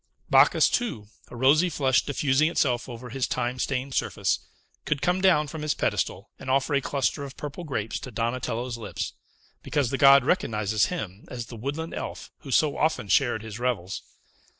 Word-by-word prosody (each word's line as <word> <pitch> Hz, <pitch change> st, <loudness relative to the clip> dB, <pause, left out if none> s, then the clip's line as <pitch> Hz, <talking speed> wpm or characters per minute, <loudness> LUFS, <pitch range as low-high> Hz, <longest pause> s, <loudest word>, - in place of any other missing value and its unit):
Bacchus, -, -, +6 dB
too, 120 Hz, -, -2 dB, 0.2 s
a -, -, -11 dB
rosy 145 Hz, +8 st, +4 dB
flush 135 Hz, -5 st, +2 dB
diffusing 145 Hz, +2 st, +2 dB
itself 125 Hz, -7 st, 0 dB
over 120 Hz, 0 st, -8 dB
his 135 Hz, 0 st, -1 dB
time 125 Hz, 0 st, -2 dB
stained 135 Hz, +1 st, -2 dB
surface, -, -, 0 dB, 0.4 s
could 150 Hz, -, -1 dB
come 180 Hz, +4 st, +1 dB
down 175 Hz, -6 st, +4 dB
from 155 Hz, +1 st, -7 dB
his 150 Hz, -1 st, 0 dB
pedestal, -, -, -2 dB
and -, -, -7 dB
offer 135 Hz, +3 st, +2 dB
a 140 Hz, -, +3 dB
cluster 140 Hz, +2 st, -1 dB
of 140 Hz, -1 st, -9 dB
purple 150 Hz, +4 st, -6 dB
grapes 115 Hz, -9 st, -3 dB
to -, -, -8 dB
Donatello's 120 Hz, +1 st, -2 dB
lips; 105 Hz, -3 st, -4 dB, 0.5 s
because 140 Hz, -5 st, 0 dB
the 135 Hz, -, -1 dB
god 140 Hz, -2 st, +7 dB
recognizes 110 Hz, -, +1 dB
him 105 Hz, -, -6 dB
as 120 Hz, -2 st, -6 dB
the 120 Hz, -, -10 dB
woodland 145 Hz, +8 st, -4 dB
elf -, -, -6 dB
who 145 Hz, -, -11 dB
so 145 Hz, +3 st, +2 dB
often 155 Hz, -9 st, 0 dB
shared 115 Hz, 0 st, +2 dB
his 110 Hz, 0 st, -7 dB
revels. 110 Hz, -7 st, -2 dB
130 Hz, 175 wpm, -26 LUFS, 120-150 Hz, 0.5 s, god